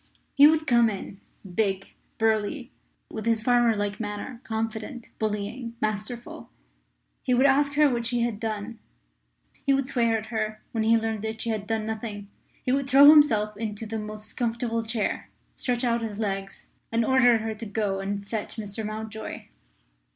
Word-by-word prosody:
He 285 +1 +8
would 315 0 +3
come 235 -4 +4
in, 195 -1 -7 0.3
big, 195 -2 0 0.2
burly, 225 +4 0 0.4
with 220 0 -5
his 225 -1 +2
farmer 240 -1 +4
like 205 0 -2
manner 220 +3 -5
confident, 225 +2 -4
bullying, 220 +3 -3
masterful. 215 +3 -4 0.7
He 250 - +1
would 260 +3 +4
ask 280 +1 +4
her 300 0 +6
what 235 -3 0
she 240 0 0
had 235 -3 -1
done; 220 0 -4 0.8
he 275 - +3
would 270 -1 -1
swear 235 -4 +2
at 215 - -6
her 215 -1 -2
when 225 -2 -1
he 225 +1 +5
learned 220 -1 -2
that 220 0 -4
she 230 - -1
had 210 -2 -3
done 220 0 -1
nothing; 215 -2 -5 0.3
he 250 - 0
would 275 0 0
throw 285 +2 +9
himself 220 -9 +4
into 215 0 -4
the 220 +1 -4
most 215 0 -6
comfortable 230 -1 -1
chair, 220 -1 -2 0.2
stretch 245 -1 -1
out 235 -1 +1
his 215 -3 -4
legs, 195 -2 -4 0.2
and 230 0 +2
order 245 -2 +5
her 220 0 -3
to 220 +1 -8
go 205 -2 -1
and 200 +1 -4
fetch 215 -1 -4
Mr. 215 -1 -4
Mountjoy. 220 +1 -6
225 Hz, 170 wpm, -26 LUFS, 215-240 Hz, 0.8 s, throw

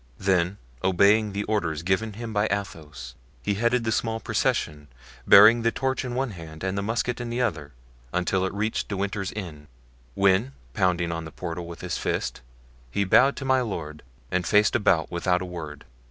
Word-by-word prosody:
Then 95 0 +1 0.3
obeying 100 +3 +4
the 100 +1 -2
orders 85 -8 -1
given 95 +5 0
him 115 +1 -6
by 105 +1 +2
Athos, 75 -11 -5 0.3
he 100 - 0
headed 120 +4 +1
the 110 - -1
small 115 0 -1
procession, 75 -8 -1 0.4
bearing 110 +4 +8
the 115 0 +2
torch 130 +1 -1
in 125 -1 -4
one 130 -1 -1
hand 80 -3 -10
and 95 0 -1
the 100 - -1
musket 115 +3 -2
in 120 - -4
the 120 +2 -2
other, 75 -10 -3 0.4
until 90 +1 0
it 95 - -1
reached 110 +2 -1
De 100 - -4
Winter's 100 0 -2
inn, 80 -8 -7 0.5
when 100 +7 +2 0.2
pounding 90 -1 +1
on 80 0 -4
the 80 - -9
portal 85 0 -6
with 85 0 -9
his 90 -3 -3
fist, - - -2 0.5
he 100 - 0
bowed 125 +8 +5
to 135 - -6
my 130 -1 +3
lord 75 -10 -5 0.3
and 90 -1 0
faced 105 0 +4
about 95 -8 +2
without 90 +1 +1
a - - -4
word. 80 -5 -8
95 Hz, 185 wpm, -25 LUFS, 85-110 Hz, 0.5 s, bearing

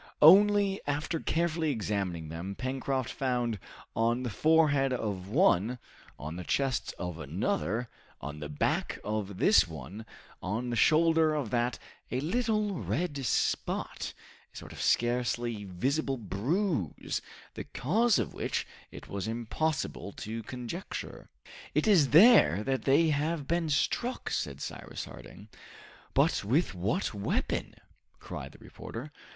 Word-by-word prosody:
Only, 200 +3 +7
after 150 +3 -1
carefully 165 -1 0
examining 100 - -2
them, 85 +5 -5
Pencroft 130 +1 -2
found 120 -5 -1 0.4
on 115 +2 +1
the 120 - -3
forehead 145 +1 +3
of 105 -7 -3
one, 125 - +3 0.4
on 75 +4 -6
the 90 - -5
chest 135 +6 0
of 90 -2 -5
another, 110 +13 -1 0.3
on 75 +1 -7
the 75 -1 -6
back 75 - -1
of 105 -2 -3
this 205 - +5
one, 85 - -8 0.3
on 115 +6 -2
the - - -1
shoulder 160 +3 +4
of 140 -8 -2
that, 120 0 0 0.3
a 125 - -1
little 210 - 0
red 150 -6 -2
spot, - - -1 0.4
a - - -13
sort - - -9
of - - -7
scarcely 120 -2 +1
visible 135 - -1
bruise, 120 - -1 0.3
the - - -6
cause 215 - +2
of - - -2
which - - -2 0.2
it - - -11
was 100 +1 -4
impossible 120 0 -2
to 115 +2 -5
conjecture. 125 - -6 0.5
"It - - +3
is 170 -10 +5
there 165 - +7
that 135 +3 -1
they 150 +4 +4
have 150 0 -1
been 170 -1 0
struck!" 235 - 0
said 70 -1 -2
Cyrus - - -6
Harding. 105 - -12 0.7
"But - - +3
with 130 - +1
what 100 - -1
weapon?" 100 -1 -2 0.4
cried - - -8
the - - -14
reporter. 130 +7 -9
125 Hz, 135 wpm, -30 LUFS, 105-160 Hz, 0.7 s, Only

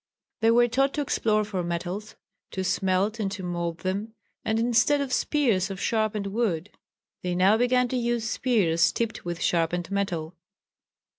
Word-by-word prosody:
They 225 - +3
were 240 +1 +5
taught 270 +3 +1
to 295 - 0
explore 215 -6 +1
for 195 -3 -3
metals, 175 +5 -4 0.4
to 190 - -2
smelt 190 +4 0
and 200 -3 -1
to 190 -2 -6
mould 170 -1 -3
them, 200 +4 -3 0.3
and 220 0 0
instead 240 +5 +3
of 275 -2 -2
spears 230 - +1
of 195 -1 -6
sharpened 215 -2 0
wood 200 -4 -1 0.5
they 180 -1 -2
now 190 +4 +5
began 245 +2 +3
to 255 - -1
use 235 -2 0
spears 175 -10 +2
tipped 230 -5 -3
with 175 0 -3
sharpened 175 +1 0
metal. 180 -5 -2
205 Hz, 160 wpm, -26 LUFS, 180-235 Hz, 0.5 s, were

